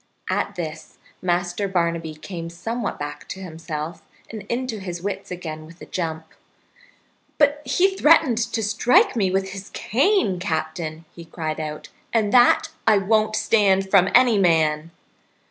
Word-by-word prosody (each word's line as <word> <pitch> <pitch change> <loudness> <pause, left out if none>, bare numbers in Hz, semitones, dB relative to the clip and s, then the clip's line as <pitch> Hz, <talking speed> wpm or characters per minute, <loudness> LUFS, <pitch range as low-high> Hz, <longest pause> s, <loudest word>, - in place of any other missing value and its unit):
At - - -1
this 160 -2 -7 0.2
Master 175 +2 -1
Barnaby 170 -4 -1
came 165 +1 -7
somewhat 220 +7 -4
back 145 0 -7
to 190 - -7
himself 160 -2 -6 0.3
and 220 -2 -6
into 240 -2 -2
his 180 -3 -6
wits 200 +3 -5
again 160 -3 -6
with 165 +1 -16
a - - -10
jump. 160 -2 -4 1.1
"But 290 0 +3
he 380 +7 +2
threatened 300 -9 +4
to 225 -1 -1
strike 245 - +3
me 200 -5 +1
with 190 +1 -1
his 195 +1 -8
cane, 255 - +1
Captain," 160 -1 -3
he 170 - -11
cried 160 -2 -4
out, 150 -1 -6 0.2
"and 220 -3 +1
that 245 -1 +5 0.2
I 215 -2 +6
won't 215 +2 +2
stand 195 -3 +2
from 190 -2 +5
any 240 -4 +5
man!" 160 -3 +2
185 Hz, 145 wpm, -22 LUFS, 165-220 Hz, 1.1 s, I